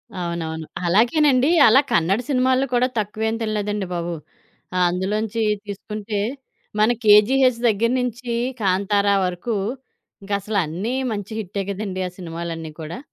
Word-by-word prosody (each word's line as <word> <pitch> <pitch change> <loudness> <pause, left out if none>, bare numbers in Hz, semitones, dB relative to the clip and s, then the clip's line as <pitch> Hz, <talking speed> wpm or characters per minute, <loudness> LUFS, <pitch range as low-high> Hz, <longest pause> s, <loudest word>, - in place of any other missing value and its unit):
అవునవును. 170 -3 -4 0.2
అలాగేనండి, 255 - +4 0.2
అలా 225 +4 +7
కన్నడ 190 0 +2
సినిమాల్లో 260 0 +2
కూడా 245 +1 +3
తక్కువేం 220 +2 -2
తినలేదండి 210 -2 -2
బాబు. 170 0 -3 0.6
ఆహ్, 180 0 +3
అందులోంచి 210 +5 -1 0.2
తీసుకుంటే 210 +1 -5 0.6
మన 215 +2 +5
'కేజీహెచ్' 235 +4 +5
దగ్గర 225 +2 +2
నుంచి 240 -1 -3 0.3
'కాంతార' 200 +1 +2
వరకు 180 +6 -3 0.7
ఇంకసలు 200 +1 -2
అన్నీ 190 +11 -3 0.2
మంచి 205 0 -5
హిట్టె 200 -1 -4
కదండీ! 195 -1 -4
ఆ - - -5
సినిమాలన్నీ 165 -2 -6
కూడా. 155 +6 -6
205 Hz, 120 wpm, -22 LUFS, 185-230 Hz, 0.7 s, అలా